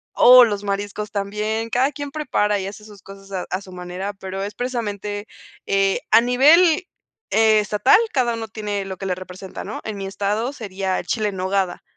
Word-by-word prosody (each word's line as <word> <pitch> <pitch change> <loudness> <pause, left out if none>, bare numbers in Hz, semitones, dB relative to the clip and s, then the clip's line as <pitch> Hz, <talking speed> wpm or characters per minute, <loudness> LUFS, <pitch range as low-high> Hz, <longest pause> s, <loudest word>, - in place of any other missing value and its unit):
Oh, 250 0 +9
los 205 -3 -3
mariscos 205 +1 -3
también. 210 +2 -2
Cada 260 +4 +2
quien 285 -1 -6
prepara 210 -9 0
y 190 - -4
hace 210 +1 -9
sus 205 -3 -14
cosas 195 0 -13
e 185 -2 -3
a 185 - -2
su 190 - -13
manera, 180 +2 -5
pero 190 0 -6
es 205 +1 -5
precisamente, 210 -4 -4 0.4
eh, 195 0 +1
a - - +7
nivel 310 +8 +4 0.4
estatal, 215 - +4 0.2
cada 240 -3 +1
uno 225 -1 -5
tiene 205 -2 -4
lo 190 -1 -6
que 195 - -5
le 180 - 0
representa, 185 +1 -9
¿no? 210 - -6
En 215 -2 -4
mi 195 - -5
estado 205 +6 -2
sería 195 -6 -3
el - - -8
chile 215 -2 0
en 200 - -7
nogada. 185 -1 -1
205 Hz, 190 wpm, -21 LUFS, 195-230 Hz, 0.4 s, Oh